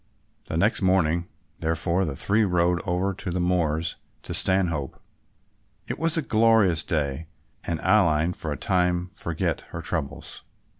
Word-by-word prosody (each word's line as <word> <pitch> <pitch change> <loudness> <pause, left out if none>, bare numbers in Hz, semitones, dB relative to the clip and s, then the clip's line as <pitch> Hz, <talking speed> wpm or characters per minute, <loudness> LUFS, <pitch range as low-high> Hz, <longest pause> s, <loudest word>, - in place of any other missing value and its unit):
The 80 - -2
next 100 +7 +2
morning 85 -2 +2 0.3
therefore, 85 +3 0
the 75 -4 -4
three 105 +9 +2
rode 90 -2 +2
over 95 +2 0
the 90 -1 -3
moors 85 -3 0 0.3
to - - -6
Stanhope. 85 -7 0 0.9
It - - -4
was 165 0 +1
a 160 - 0
glorious 110 -9 +3
day 75 -1 -2 0.4
and 85 -2 -2
Aline 85 -5 +3
for 80 - -5
a 75 - -3
time 90 -1 0
forgot 85 -4 -2
her - - -6
troubles. - - -4
90 Hz, 140 wpm, -25 LUFS, 80-95 Hz, 0.9 s, glorious